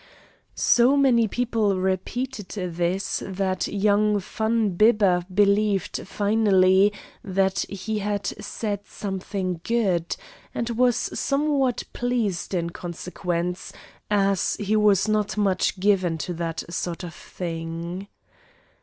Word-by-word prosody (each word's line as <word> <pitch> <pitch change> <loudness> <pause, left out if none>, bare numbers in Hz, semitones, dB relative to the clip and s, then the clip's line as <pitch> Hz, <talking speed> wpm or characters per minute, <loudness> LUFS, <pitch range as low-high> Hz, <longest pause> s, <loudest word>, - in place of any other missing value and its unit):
So 245 +4 +4
many 245 -5 +4
people 220 -4 0
repeated 205 +4 -2
this 180 0 -1
that 190 -1 -1
young 210 +1 +2
Van 220 +2 0
Bibber 200 -2 +4
believed 200 -1 +1
finally 200 -2 +4 0.3
that 190 0 +1
he 205 +2 -3
had 205 -1 -2 0.2
said 205 -3 -3
something 190 -3 -4
good, 195 -8 0 0.4
and 235 0 -2
was 245 0 +3
somewhat 275 -3 0
pleased 230 -7 -1
in 170 -1 -1
consequence, 175 0 -4 0.4
as 200 -2 +2
he 210 +1 0
was 210 -2 +4
not 215 -1 0
much 195 -1 +1
given 185 -4 +2
to 175 +3 -4
that 165 -1 -3
sort 175 +1 -3
of 170 -2 -7
thing. 170 +2 -6
200 Hz, 110 wpm, -24 LUFS, 180-215 Hz, 0.4 s, So